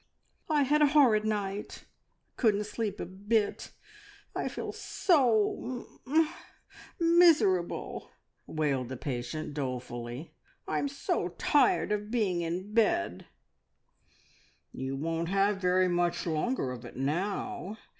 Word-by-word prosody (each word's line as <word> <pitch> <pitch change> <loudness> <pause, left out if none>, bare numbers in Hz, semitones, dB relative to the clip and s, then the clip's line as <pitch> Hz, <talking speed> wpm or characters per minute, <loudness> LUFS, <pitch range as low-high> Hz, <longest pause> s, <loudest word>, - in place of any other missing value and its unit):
"I 300 -2 +3
had 295 +3 +2
a 300 - +7
horrid 255 -8 +4
night. 205 -1 -3
I - - -22
couldn't 210 -3 +3
sleep 210 -1 -4
a - - -3
bit. 205 +4 -1 0.6
I - - -1
feel - - -4
so 250 - +2
mum 250 0 -7
mum 310 +3 +3 0.9
miserable!" 195 - +3 0.4
wailed 140 -5 -1
the 130 - -5
patient 135 +4 -4
dolefully. 125 0 -5 0.3
"I'm - - 0
so 280 0 -1
tired 295 - +3
of 210 0 -1
being 205 -7 0
in 180 +5 -4
bed." 150 - +1 1.4
"You 130 +1 -4
won't 165 +3 -2
have 195 +1 +2
very 185 0 +3
much 175 -1 0
longer 160 - -1
of 125 -2 -7
it - - -10
now. 190 - -2
195 Hz, 120 wpm, -30 LUFS, 155-230 Hz, 1.4 s, a